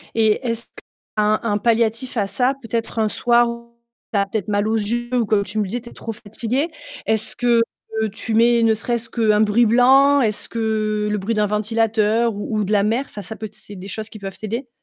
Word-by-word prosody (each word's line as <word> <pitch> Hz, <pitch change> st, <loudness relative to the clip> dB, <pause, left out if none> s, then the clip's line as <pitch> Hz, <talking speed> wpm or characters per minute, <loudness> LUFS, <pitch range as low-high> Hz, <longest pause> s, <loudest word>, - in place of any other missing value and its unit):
Et 220 Hz, +2 st, +2 dB
est-ce 230 Hz, 0 st, -2 dB, 0.5 s
qu'un 210 Hz, 0 st, +3 dB
un 210 Hz, -3 st, +1 dB
palliatif 230 Hz, +2 st, 0 dB
à 200 Hz, -, +1 dB
ça, 250 Hz, +6 st, +1 dB
peut-être 230 Hz, 0 st, -3 dB
un 215 Hz, -1 st, +2 dB
soir 240 Hz, +2 st, +3 dB, 0.7 s
tu 205 Hz, -, +2 dB
as 200 Hz, -, +2 dB
peut-être 200 Hz, -1 st, -3 dB
mal 205 Hz, 0 st, +1 dB
aux 220 Hz, -, +1 dB
yeux 235 Hz, +3 st, -1 dB
ou 245 Hz, -2 st, +2 dB
comme 205 Hz, -1 st, +2 dB
tu 205 Hz, +2 st, -4 dB
me 205 Hz, -, 0 dB
disais, 240 Hz, +5 st, -3 dB
tu 235 Hz, -, -11 dB
es -, -, -15 dB
trop 225 Hz, -, -6 dB
fatiguée, 240 Hz, -, -2 dB, 0.4 s
est-ce 220 Hz, +1 st, 0 dB
que 240 Hz, -1 st, +3 dB, 0.5 s
tu 225 Hz, 0 st, -4 dB
mets 235 Hz, +1 st, +4 dB
ne 225 Hz, -1 st, +4 dB
serait-ce 230 Hz, +1 st, -2 dB
qu'un 215 Hz, -3 st, +2 dB
bruit 220 Hz, +2 st, +4 dB
blanc? 270 Hz, +4 st, +5 dB
Est-ce 215 Hz, -4 st, -1 dB
que 215 Hz, -2 st, -1 dB
le 210 Hz, -, 0 dB
bruit 215 Hz, +4 st, -2 dB
d'un 210 Hz, -, +2 dB
ventilateur 220 Hz, +2 st, +1 dB
ou 210 Hz, +2 st, -3 dB
ou -, -, +1 dB
de 200 Hz, -, -3 dB
la 205 Hz, -2 st, +4 dB
mer, 230 Hz, +6 st, 0 dB
ça, 205 Hz, -, -7 dB
ça 220 Hz, +2 st, -8 dB
peut 220 Hz, -1 st, -6 dB
c'est 215 Hz, -1 st, -11 dB
des 190 Hz, +1 st, -9 dB
choses 220 Hz, +2 st, -4 dB
qui 215 Hz, -, -10 dB
peuvent 195 Hz, -1 st, -7 dB
t'aider? 230 Hz, +4 st, -4 dB
220 Hz, 220 wpm, -21 LUFS, 210-235 Hz, 0.7 s, blanc